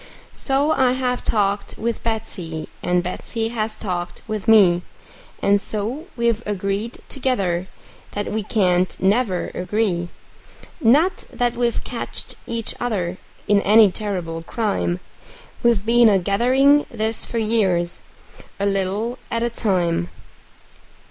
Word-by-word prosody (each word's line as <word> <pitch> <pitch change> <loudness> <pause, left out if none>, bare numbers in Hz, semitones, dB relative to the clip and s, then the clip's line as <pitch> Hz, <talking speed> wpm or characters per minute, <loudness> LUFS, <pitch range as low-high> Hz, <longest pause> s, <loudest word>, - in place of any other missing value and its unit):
So 280 +2 +1
I 260 -4 +3
have 250 -1 -1
talked 200 -1 0
with 230 +1 -2
Betsey, 180 -8 -3
and 180 0 +1
Betsey 225 +5 -3
has 220 -2 -2
talked 180 -4 -4
with 215 -3 -4
me, 190 -6 +6 0.6
And 200 0 +4
so 230 - -3
we've 235 -1 +1
agreed 200 +3 -3
together 195 -10 -1 0.5
that 205 0 -3
we 220 +1 -1
can't 185 -4 +1
never 195 -1 +1
agree; 180 -2 -1 0.7
Not 315 +8 +3
that 245 -1 0
we've 240 -1 0
catched 240 - -5
each 230 -1 -3
other 185 -7 -2 0.3
in 205 -1 +4
any 210 -1 +6
terrible 180 -6 -4
crime; 195 -2 -1 0.6
We've 235 -4 +2
been 235 0 +6
a 200 - +4
gathering 255 +10 +3
this 220 -1 -1
for 235 - -4
years, 195 -6 +1 0.6
a 200 - 0
little 200 +5 -1
at 230 0 -1
a 235 - 0
time. 175 -6 0
215 Hz, 125 wpm, -21 LUFS, 185-235 Hz, 0.7 s, me